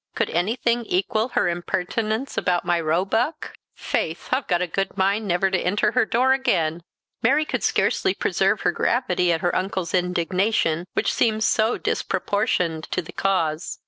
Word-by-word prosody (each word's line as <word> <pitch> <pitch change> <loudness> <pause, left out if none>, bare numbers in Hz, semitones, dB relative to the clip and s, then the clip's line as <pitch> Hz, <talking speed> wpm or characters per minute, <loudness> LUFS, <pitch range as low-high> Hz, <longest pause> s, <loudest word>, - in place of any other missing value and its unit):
Could - - -1
anything 235 +6 0
equal 215 +4 0
her - - +3
impertinence 215 +8 -2
about 175 -2 0
my 175 -1 +1
roebuck? 195 - -1 0.2
Faith, 160 +1 -3
I've 260 +1 0
a 180 -1 +2
good 195 +3 -3
mind 200 +3 +1
never 190 +1 +1
to 190 - +1
enter 205 +3 +1
her - - +2
door 255 +3 +3
again!" 170 -11 0 0.4
Mary 285 +7 +3
could - - -3
scarcely - - +1
preserve - - +1
her - - +2
gravity 180 -8 +1
at 165 -1 0
her 175 - 0
uncle's 185 -2 -2
indignation, 180 -1 0
which - - 0
seemed 220 -2 +1
so 220 +2 +2
disproportioned 180 -6 -1
to - - -2
the 175 - -11
cause. 170 -4 -1
190 Hz, 155 wpm, -23 LUFS, 175-220 Hz, 0.4 s, her